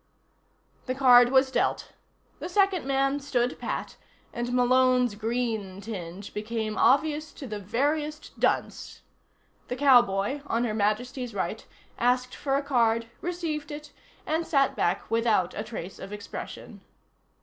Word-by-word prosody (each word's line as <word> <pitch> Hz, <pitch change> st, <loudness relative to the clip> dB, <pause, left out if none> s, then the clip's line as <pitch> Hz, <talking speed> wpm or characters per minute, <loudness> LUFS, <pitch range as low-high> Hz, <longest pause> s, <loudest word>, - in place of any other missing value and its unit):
The 255 Hz, -, -1 dB
card 245 Hz, -2 st, +7 dB
was 265 Hz, 0 st, +4 dB
dealt. -, -, 0 dB, 0.5 s
The -, -, -5 dB
second 385 Hz, -5 st, +2 dB
man 275 Hz, +1 st, +1 dB
stood 255 Hz, -3 st, -1 dB
pat -, -, -4 dB, 0.4 s
and 240 Hz, +1 st, -3 dB
Malone's 250 Hz, -1 st, +3 dB
green 220 Hz, -3 st, -2 dB
tinge 195 Hz, -2 st, -7 dB
became 215 Hz, 0 st, -3 dB
obvious 305 Hz, +2 st, +2 dB
to 280 Hz, -, -9 dB
the 215 Hz, -4 st, -5 dB
veriest 295 Hz, +9 st, -2 dB
dunce. -, -, -1 dB, 0.7 s
The 250 Hz, -, -3 dB
cowboy, 245 Hz, -2 st, +4 dB
on 235 Hz, -2 st, 0 dB
Her 225 Hz, -3 st, -1 dB
Majesty's 230 Hz, +3 st, -1 dB
right, 190 Hz, +3 st, -3 dB, 0.4 s
asked 250 Hz, +1 st, +1 dB
for 275 Hz, -1 st, -1 dB
a 280 Hz, -, 0 dB
card, 230 Hz, -4 st, +1 dB
received 330 Hz, -4 st, -3 dB
it 295 Hz, 0 st, -8 dB, 0.3 s
and 320 Hz, +2 st, -1 dB
sat 275 Hz, -4 st, +2 dB
back 175 Hz, +5 st, -1 dB
without 225 Hz, -6 st, +2 dB
a 210 Hz, -, -4 dB
trace 195 Hz, -5 st, -7 dB
of 195 Hz, -, -8 dB
expression. 205 Hz, -1 st, -8 dB
245 Hz, 135 wpm, -27 LUFS, 215-280 Hz, 0.7 s, card